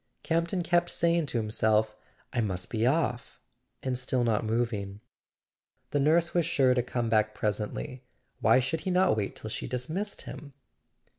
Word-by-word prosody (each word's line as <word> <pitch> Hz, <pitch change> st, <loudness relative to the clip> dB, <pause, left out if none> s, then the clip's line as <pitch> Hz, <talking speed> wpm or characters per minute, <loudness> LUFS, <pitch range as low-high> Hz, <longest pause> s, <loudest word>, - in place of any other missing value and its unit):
Camp 165 Hz, +1 st, +1 dB
ton 180 Hz, 0 st, -2 dB
kept 175 Hz, 0 st, +2 dB
saying 170 Hz, -2 st, +1 dB
to 125 Hz, -, -2 dB
himself: 110 Hz, 0 st, +1 dB, 0.4 s
"I 120 Hz, -, +1 dB
must 95 Hz, -4 st, -2 dB
be 115 Hz, 0 st, +1 dB
off," 130 Hz, -4 st, 0 dB, 0.4 s
and 130 Hz, -1 st, -1 dB
still 125 Hz, 0 st, 0 dB
not 115 Hz, -2 st, +1 dB
moving. 110 Hz, -3 st, -2 dB, 0.9 s
The 145 Hz, -, +1 dB
nurse 165 Hz, +4 st, +3 dB
was 175 Hz, -, +3 dB
sure 135 Hz, -5 st, +3 dB
to 125 Hz, -, +2 dB
come 120 Hz, -1 st, -2 dB
back 110 Hz, -1 st, +2 dB
presently—why 125 Hz, +5 st, -1 dB
should 155 Hz, +5 st, -2 dB
he -, -, -3 dB
not 185 Hz, -3 st, +3 dB
wait 105 Hz, -3 st, -2 dB
till 110 Hz, -, -7 dB
she -, -, -4 dB
dismissed 155 Hz, -, -3 dB
him? 145 Hz, -2 st, -9 dB
125 Hz, 160 wpm, -29 LUFS, 110-160 Hz, 0.9 s, nurse